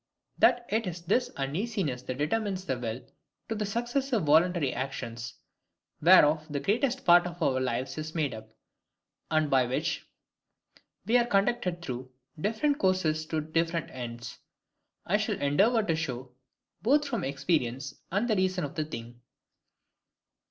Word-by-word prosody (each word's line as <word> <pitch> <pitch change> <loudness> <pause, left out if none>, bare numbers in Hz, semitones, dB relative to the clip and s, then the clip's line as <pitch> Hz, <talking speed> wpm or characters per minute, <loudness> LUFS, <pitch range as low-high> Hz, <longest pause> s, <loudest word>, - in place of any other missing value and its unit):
That 240 - +4
it 220 0 0
is 175 -1 -5
this 245 +9 +1
uneasiness 150 - -2
that 130 0 -5
determines 190 +5 -1
the 130 - 0
will 120 +1 -4 0.4
to - - 0
the 210 -2 -2
successive 240 +1 -1
voluntary 160 -1 +3
actions, 120 -2 -5 0.7
whereof 155 -2 +6
the 145 -1 -2
greatest 245 - 0
part 175 0 +6
of 175 0 -8
our 135 -6 +2
lives 130 +3 -2
is 155 +1 -6
made 150 -5 0
up, 110 0 -9 0.8
and 155 -1 +2
by 130 -3 +3
which 125 - -2 1.0
we 235 +4 +4
are 240 - +1
conducted 195 -4 +1
through 130 -3 -5 0.3
different 230 - 0
courses 160 -5 +1
to 155 -1 -1
different 165 +1 -1
ends, 120 -2 -7 0.7
I - - +2
shall - - -2
endeavour 205 - +3
to 165 -6 0
show, 130 -5 -4 0.5
both 290 +6 +3
from 235 -9 -2
experience, 140 -2 -1 0.2
and 200 +6 +1
the 220 - +2
reason 185 -2 +1
of 145 - -4
the 155 - -2
thing. 120 -5 -8
160 Hz, 145 wpm, -29 LUFS, 135-205 Hz, 1.0 s, whereof